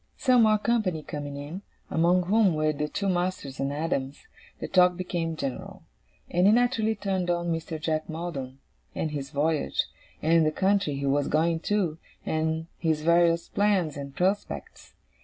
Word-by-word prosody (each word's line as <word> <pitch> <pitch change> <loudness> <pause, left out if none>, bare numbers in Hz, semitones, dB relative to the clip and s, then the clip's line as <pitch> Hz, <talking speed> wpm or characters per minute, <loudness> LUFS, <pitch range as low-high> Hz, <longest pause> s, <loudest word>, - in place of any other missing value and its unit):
Some 255 -3 +4
more 215 -1 +5
company 210 -8 0
coming 145 -1 -6
in, 150 +7 -6 0.3
among 175 +2 +3
whom 195 -1 +3
were 155 0 +1
the 150 +1 -2
two 200 +6 -3
masters 175 -7 -2
and 135 +1 -1
Adams, 145 - -3 0.3
the - - -4
talk 180 -1 +4
became 170 -3 -2
general; 135 -4 -5 0.4
and 180 +2 +3
it 210 - +6
naturally 230 -2 +2
turned 190 -3 -2
on 175 -1 0
Mr. 165 -1 -4
Jack 155 0 -2
Maldon, 155 -6 -5 0.4
and 155 - -2
his 140 -2 -4
voyage, 150 +1 0 0.4
and 165 +1 +4
the 155 - +3
country 190 -3 +1
he 140 0 -3
was 140 +1 +1
going 160 +2 +1
to, 175 -4 -1 0.3
and 160 0 -1
his 160 -2 0
various 170 0 +3
plans 195 -7 +1
and 140 -1 -7
prospects. 195 +3 -2
165 Hz, 160 wpm, -27 LUFS, 150-185 Hz, 0.4 s, it